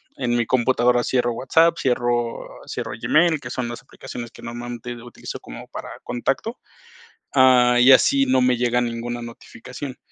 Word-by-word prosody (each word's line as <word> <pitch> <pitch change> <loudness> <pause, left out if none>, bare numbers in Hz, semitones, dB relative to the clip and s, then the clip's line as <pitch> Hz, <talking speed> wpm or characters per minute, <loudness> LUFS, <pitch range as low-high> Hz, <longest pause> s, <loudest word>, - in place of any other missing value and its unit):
en 120 -2 -1
mi 120 - +1
computadora 120 0 +2
cierro 120 -2 0
WhatsApp, 165 +8 +3
cierro 120 -2 -1 0.2
cierro - - -5
Gmail, 160 0 +3
que 120 -3 -8
son 125 -1 -3
las 120 - -7
aplicaciones 125 -2 -9
que - - -15
normalmente 120 +1 -6
utilizo 120 0 -8
como - - -11
para - - -8
contacto, 135 - -3 0.8
ah, 125 -2 +5
y 130 +2 +7
así 135 +2 +5
no 130 0 +2
me 125 0 +3
llega 120 0 +1
ninguna 120 0 -3
notificación. 125 +3 -9
125 Hz, 155 wpm, -22 LUFS, 120-130 Hz, 0.8 s, y